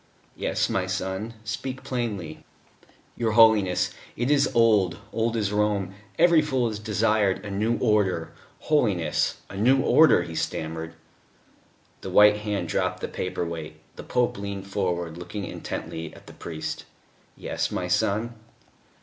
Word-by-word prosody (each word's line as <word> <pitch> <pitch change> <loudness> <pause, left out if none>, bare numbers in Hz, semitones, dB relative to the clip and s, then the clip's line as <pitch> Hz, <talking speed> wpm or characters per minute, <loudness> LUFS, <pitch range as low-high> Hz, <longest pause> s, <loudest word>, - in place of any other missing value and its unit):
"Yes, - - 0
my 95 -1 -1
son, 95 +4 -3
speak 130 +5 -5
plainly." 115 -9 -4 0.7
"Your 115 -2 0
Holiness 110 -5 +4 0.2
it 120 +4 0
is 140 -2 +4
old 105 -7 +4 0.2
old 115 +1 0
as 105 -3 0
Rome 105 -3 0 0.2
every 170 -1 +6
fool 130 -6 0
has 105 -1 -5
desired 105 -2 +1
it: 100 - -13
a 100 - -5
new 110 +4 0
Order, 105 -8 +1 0.3
Holiness 100 - +1
a - - -10
new 125 +7 +4
Order," 160 0 +5
he 85 - -8
stammered. 80 +1 -4 1.1
The - - -6
white 105 0 +6
hand 105 -1 -3
dropped - - -1
the - - -2
paper 90 -1 -3
weight; 80 -2 -6 0.2
the - - -8
Pope 125 -4 0
leaned 100 -1 -5
forward, 90 -4 -2
looking 95 +3 -5
intently 80 +1 -6
at - - -15
the - - -12
priest. 80 -2 -6 0.5
"Yes, - - -2
my - - -3
son?" 110 +4 0
105 Hz, 145 wpm, -25 LUFS, 95-115 Hz, 1.1 s, every